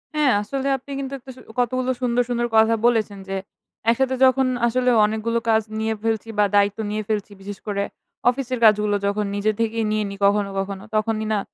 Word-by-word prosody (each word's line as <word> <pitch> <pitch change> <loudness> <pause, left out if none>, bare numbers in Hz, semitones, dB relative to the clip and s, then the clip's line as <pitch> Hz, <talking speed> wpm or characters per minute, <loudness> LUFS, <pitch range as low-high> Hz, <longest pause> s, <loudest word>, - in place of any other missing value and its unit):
হ্যাঁ, 295 -4 +3
আসলে 270 +6 -3
আপনি 265 +2 -13
কিন্তু 275 0 -5
একটা 260 +1 -11
সু - - -14 0.2
কতগুলো 255 +1 +1
সুন্দর, 245 0 +2
সুন্দর 240 0 0
কথা 220 +1 +5
বলেছেন। 215 -4 +1
যে, 195 - -2 0.5
একসাথে 260 +3 +2
যখন 260 0 +3 0.2
আসলে 250 +1 +1 0.2
অনেকগুলো 220 +2 -1
কাজ 220 0 +4 0.2
নিয়ে 220 0 0
ফেলছি, 225 0 -1
বা 205 - +6
দায়িত্ব 205 +1 +3
নিয়ে 215 0 -2
ফেলছি, 210 -1 -2
বিশেষ 200 +1 -7
করে 200 -1 -1 0.5
অফিসের 255 -1 -2
কাজগুলো 210 -1 +4
যখন 210 +1 0
নিজে 205 +2 +1
থেকেই 225 0 0
নিয়ে 215 0 +1
নিই, 200 - -7
কখনো, 200 0 +2
কখনো। 195 0 -4
তখনই 220 0 0
না 210 - +1
220 Hz, 185 wpm, -22 LUFS, 210-250 Hz, 0.5 s, বা